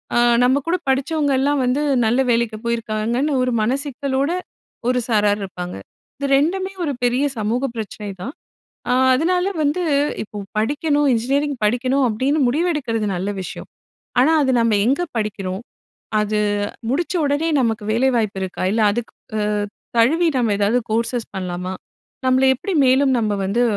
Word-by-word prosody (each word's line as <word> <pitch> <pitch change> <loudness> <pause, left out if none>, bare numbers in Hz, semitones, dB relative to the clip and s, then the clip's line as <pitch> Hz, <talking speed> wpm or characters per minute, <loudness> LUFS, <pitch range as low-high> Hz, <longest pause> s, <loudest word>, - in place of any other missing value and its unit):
அ - - +3 0.3
நம்ம 260 +2 +4
கூட 340 - +2
படிச்சவங்கலாம் 280 0 +1
வந்து 260 +4 +1 0.2
நல்ல 235 +4 +2
வேலைக்கு 230 -2 0
போயிருக்காங்கன்னு 235 +4 -1
ஒரு 255 0 +1
மனசிக்கலோட 275 +4 -1 0.6
ஒரு 250 0 +2
சாரார் 210 -1 +2
இருப்பாங்க. 180 -1 -6 0.4
இது 280 - -2
2மே 375 +6 0
ஒரு 305 - 0
பெரிய 245 +3 +2
சமூக 230 +5 0
பிரச்சனை 210 -2 -6
தான். 260 +9 -5 0.6
அ - - +3 0.2
அதனால 360 +6 +1 0.2
வந்து 300 +5 +1 0.4
இப்போ 210 - -10 0.2
படிக்கணும் 290 +5 +1
இன்ஜினியரிங் 275 +5 0
படிக்கணும் 255 +5 +2
அப்படின்னு 260 +7 0
முடிவெடுக்கிறது 270 -7 0
நல்ல 190 +3 -2
விஷயம். 180 - -8 0.5
ஆனா, 275 +6 +5
"அது 265 - +2
நம்ம 230 -1 +2
எங்க 275 +6 +2 0.2
படிக்கிறோம்? 195 -3 -3 0.6
அது 210 0 0 0.5
முடிச்ச 340 +6 -1
உடனே 290 +3 +1
நமக்கு 225 -3 0
வேலை 245 +4 +3
வாய்ப்பு 215 -4 -1
இருக்கா? 185 -1 -4
இல்ல 220 +1 +2
அதுக்கு 235 +1 -4 0.3
அ 210 - 0 0.5
தழுவி 320 +9 +4
நம்ம 235 -4 +2
ஏதாவது 205 +4 +2
கோர்ஸ்சஸ் 230 +1 -1
பண்ணலாமா? 180 0 -4 0.5
நம்மள 260 +1 +4
எப்படி 365 +8 -4
மேலும் 265 +1 +4
நம்ம 215 -2 0
வந்து 210 +6 +1
250 Hz, 140 wpm, -20 LUFS, 215-285 Hz, 0.6 s, ஆனா